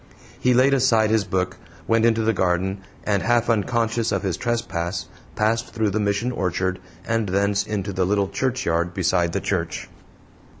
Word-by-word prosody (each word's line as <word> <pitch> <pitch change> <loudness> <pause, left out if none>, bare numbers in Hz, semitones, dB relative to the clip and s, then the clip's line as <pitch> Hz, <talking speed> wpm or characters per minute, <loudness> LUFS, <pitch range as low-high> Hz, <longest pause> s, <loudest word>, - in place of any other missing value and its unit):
He 125 0 +3
laid 130 +3 +5
aside 115 -5 +3
his 110 -2 +2
book, 95 0 -1 0.3
went 115 0 +3
into 115 -1 +3
the 110 +1 +2
garden, 95 +1 0 0.2
and, 100 -2 +1
half 120 0 +2
unconscious 115 +1 0
of 100 -1 -1
his 95 -4 0
trespass, 95 -5 -2 0.3
passed 115 +3 0
through 110 -2 +1
the 110 - 0
Mission 105 +4 0
orchard 95 -3 -1 0.3
and 115 -3 0
thence 100 +2 +1
into 100 -2 -3
the 95 0 +1
little 100 +1 +1
churchyard 95 -6 -1
beside 90 -2 +1
the - - -1
church. - - -2
105 Hz, 165 wpm, -23 LUFS, 95-115 Hz, 0.3 s, laid